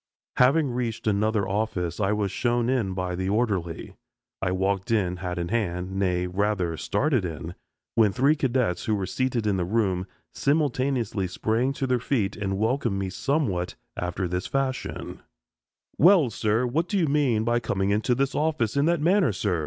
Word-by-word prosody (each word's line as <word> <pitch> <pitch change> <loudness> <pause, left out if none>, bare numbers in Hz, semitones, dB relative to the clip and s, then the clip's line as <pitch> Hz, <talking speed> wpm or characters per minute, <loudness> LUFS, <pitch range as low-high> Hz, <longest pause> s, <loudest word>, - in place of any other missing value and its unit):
Having 135 +2 +4
reached 120 -2 -3
another 105 -1 +1
office, 95 -4 -2
I 100 -1 +1
was 105 -2 0
shown 120 0 0
in 105 -8 0
by 90 -1 -2
the 95 +1 -2
orderly. 100 -7 -1 0.5
I 90 - 0
walked 95 +1 -1
in, 95 -6 +1
hat 90 0 -4
in 85 0 -2
hand 90 -5 -1
nay, 90 -2 +1
rather 95 -2 0
started 130 - 0
in 80 0 -5 0.4
when 110 -3 +4
three 140 +9 +3
cadets, 125 - 0
who 110 - +1
were 100 -2 -2
seated 125 +2 -1
in 100 -2 +1
the 90 - 0
room, 95 -2 0 0.3
simultaneously 130 - 0
sprang 110 +8 0
to 135 - -2
their 125 -1 +1
feet 115 -5 -1
and 95 -2 -2
welcomed 115 -1 0
me 95 -1 -2
somewhat 100 - -1 0.2
after 90 +1 -2
this 90 +1 -3
fashion: 135 -2 -3 0.8
"Well, 170 - +6
sir, 110 +3 +1
what 155 +8 0
do 205 - -1
you 175 - +3
mean 140 -7 +2
by 120 +1 +2
coming 100 -4 -1
into 110 +4 +1
this 135 +1 0
office 150 -7 0
in 140 +1 +3
that 170 -1 +2
manner, 180 - +3
sir? 95 -3 -1
110 Hz, 175 wpm, -26 LUFS, 95-130 Hz, 0.8 s, Well